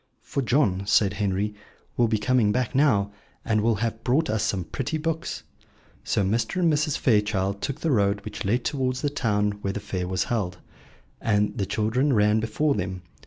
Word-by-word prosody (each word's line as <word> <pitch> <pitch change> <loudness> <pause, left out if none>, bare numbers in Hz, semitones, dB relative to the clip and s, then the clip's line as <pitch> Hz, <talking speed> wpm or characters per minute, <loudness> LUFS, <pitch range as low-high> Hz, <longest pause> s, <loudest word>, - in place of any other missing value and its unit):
"For 140 - -2
John," 120 -7 +2
said 100 -2 +3
Henry, 100 +1 -1 0.4
"will 120 - +3
be 110 -1 +1
coming 110 -1 +2
back 125 +1 -1
now, 125 -8 +3 0.3
and 110 -1 +2
will 115 +1 +2
have 115 +1 -3
brought 140 +4 +2
us 110 -1 0
some 100 -4 0
pretty 135 - -3
books." 165 +1 -3 0.6
So 100 - +1
Mr. 115 - 0
and 170 -3 +3
Mrs. 150 0 +1
Fairchild 105 -4 +1
took 140 +1 -4
the 165 - +1
road 100 -3 +1
which 105 -1 -5
led 120 +5 0
towards 130 -2 -1
the 145 - +1
town 105 -7 +1
where 100 -1 -2
the 105 - -3
fair 95 -3 -4
was 95 -1 0
held, 95 -6 -2 0.6
and 105 -2 +1
the 100 - -2
children 125 +6 +1
ran 105 0 +3
before 115 +7 0
them. 95 -4 -4
110 Hz, 185 wpm, -25 LUFS, 100-130 Hz, 0.6 s, said